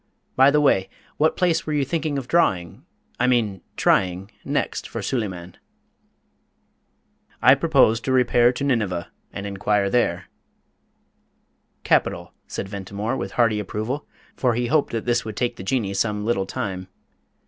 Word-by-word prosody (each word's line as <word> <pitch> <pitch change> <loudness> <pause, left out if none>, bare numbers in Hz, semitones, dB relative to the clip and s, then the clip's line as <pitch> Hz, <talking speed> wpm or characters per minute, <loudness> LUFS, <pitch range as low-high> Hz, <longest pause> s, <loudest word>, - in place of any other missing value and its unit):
By 135 +2 +6
the 150 +1 +3
way, 95 -10 +3 0.3
what 155 +1 +2
place 175 -4 +1
were 155 - -1
you 145 -2 +1
thinking 155 -1 -2
of 130 -3 -5
drawing 105 - 0 0.3
I 125 - +3
mean 110 -6 +1 0.2
trying 95 +2 +1
next - - -2
for - - -5
Suleyman?" 95 -8 -3 1.8
"I - - +7
purpose 110 +1 +3
to 125 +3 -3
repair 125 -1 +4
to 125 - -5
Nineveh, 105 -11 -1 0.2
and 100 - -6
inquire 100 0 0
there." 125 - +1 1.6
"Capital," - - +1
said - - -5
Ventimore, 100 +4 -4
with 95 -5 -5
hearty 115 -3 +2
approval, 110 +8 -4 0.3
for 125 -3 +1
he 120 +1 0
hoped 150 +4 +1
that 115 -2 -3
this 120 -1 +1
would 110 -1 -7
take 120 -1 -1
the - - -7
Jinnee 100 -2 -1
some 105 0 -1
little 100 -5 0
time. 95 -2 -4
115 Hz, 150 wpm, -23 LUFS, 100-130 Hz, 1.8 s, I